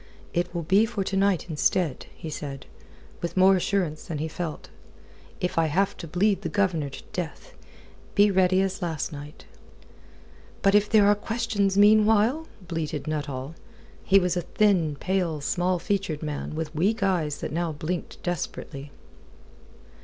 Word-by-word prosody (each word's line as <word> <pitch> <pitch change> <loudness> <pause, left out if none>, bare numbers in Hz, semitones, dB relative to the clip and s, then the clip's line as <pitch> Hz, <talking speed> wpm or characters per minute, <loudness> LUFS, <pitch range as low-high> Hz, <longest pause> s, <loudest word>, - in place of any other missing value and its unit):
"It 175 +1 0
will 170 - -1
be 195 +7 +4
for 220 -4 -2
to 195 - -3
night 195 -3 +2
instead," 160 -1 0
he 160 - -7
said, 140 -2 -6 0.6
with 170 +2 -4
more 190 +1 +6
assurance 180 -4 -1
than 160 - -4
he 155 +2 -2
felt, 160 -1 -5 0.7
"if 180 -1 0
I 165 - +3
have 190 +6 +1
to 165 - -7
bleed 190 +4 +1
the 170 - -3
Governor 170 -5 0
to - - -10
death. 180 - -5 0.6
Be 205 0 +5
ready 185 0 +3
as 195 0 -3
last 165 -4 -2
night." 145 +1 -10 1.2
"But 195 - +4
if 210 0 +4
there 215 -2 +5
are 205 - +6
questions 210 -2 -1
meanwhile?" 215 +8 +5 0.2
bleated 160 -4 -3
Nuttall. 145 -2 -4 0.5
He 195 - +5
was 180 -2 +2
a 175 - 0
thin, 175 -4 +2
pale, 175 -1 -1
small 180 +5 0
featured, 180 -4 -2
man 150 0 -4
with 160 -1 -4
weak 200 +7 +1
eyes 170 -7 +1
that - - -4
now 170 0 -1
blinked 155 +4 -5
desperately. 145 -4 -4
180 Hz, 155 wpm, -26 LUFS, 155-200 Hz, 1.2 s, more